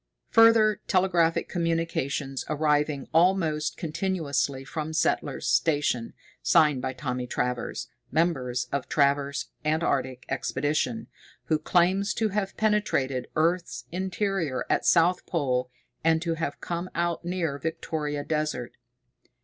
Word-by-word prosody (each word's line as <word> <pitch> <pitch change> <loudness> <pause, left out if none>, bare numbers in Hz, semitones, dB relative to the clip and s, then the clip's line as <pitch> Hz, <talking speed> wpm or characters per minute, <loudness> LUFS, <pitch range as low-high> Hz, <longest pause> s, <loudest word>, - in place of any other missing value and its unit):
Further 225 -2 +6
telegraphic 180 -3 +2
communications 165 -5 -1
arriving 150 -2 +1
almost 165 -3 +2
continuously 155 -5 -1
from 155 +2 -4
Settler's 160 - 0
Station, 145 -7 +1 0.3
signed 150 -5 +4
by 130 - -2
Thomas 125 -1 -3
Travers, 125 -1 -2 0.2
member 155 -4 +1 0.2
of 140 -2 -2
Travers 140 -1 +1
Antarctic 140 -5 0
Expedition, 135 -2 -1 0.4
who 155 - +1
claims 185 +5 +2
to 220 -1 +1
have 195 -1 -2
penetrated 205 -12 +1
earth's 170 +3 0
interior 185 -5 -1
at - - +1
south 175 +1 +3
pole 130 -6 0 0.3
and 160 0 +4
to 170 -1 0
have 160 -3 -3
come 175 +1 -4
out 170 0 -1
near 170 -5 -2
Victoria 150 -2 -3
Desert. 150 -6 -2
155 Hz, 110 wpm, -27 LUFS, 140-175 Hz, 0.4 s, Further